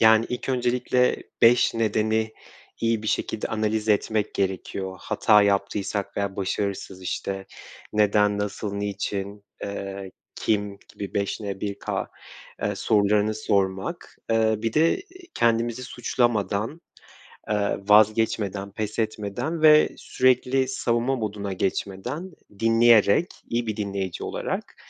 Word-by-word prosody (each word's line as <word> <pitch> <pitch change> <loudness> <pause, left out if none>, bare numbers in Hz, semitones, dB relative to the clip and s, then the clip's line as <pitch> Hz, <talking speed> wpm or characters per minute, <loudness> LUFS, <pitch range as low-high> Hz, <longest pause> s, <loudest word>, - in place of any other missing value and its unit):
yani, 110 0 +6
ilk 125 +2 -4
öncelikle 125 0 +2 0.3
5 120 0 +5
nedeni 110 0 +1 0.5
iyi 115 -2 +1
bir - - -6
şekilde 110 - -1
analiz 110 0 -1
etmek 105 0 +1
gerekiyor. 95 0 -2
Hata 105 -2 +4
yaptıysak 100 0 -1
veya 100 -1 -2
başarısız, 95 -1 -3
işte, 95 +1 -3 0.5
neden, 105 -1 +3
nasıl, 105 0 -3
niçin, 100 0 -4 0.2
eee, 100 -1 -5 0.2
kim 105 -2 -1 0.2
gibi 100 - -7
5N1K, 100 0 -3 0.5
eee, 105 0 0
sorularını 105 +1 +2
sormak, 100 - -1
eee, 110 -1 +3
bir 115 +1 -2
de 165 - +3 0.3
kendimizi 115 +1 +1
suçlamadan, 120 - -1 0.7
eee, 105 - +2 0.3
vazgeçmeden, 105 -2 +3
pes 110 +2 -4
etmeden 110 +9 -2
ve 155 -1 +7
sürekli 130 +1 +2
savunma 125 0 0
moduna 105 -4 -3
geçmeden, 100 - -3 0.3
dinleyerek, 115 - +5 0.2
iyi 115 0 -1
bir 110 -1 -2
dinleyici 100 -3 -3
olarak, - - -4
105 Hz, 110 wpm, -25 LUFS, 100-115 Hz, 0.7 s, ve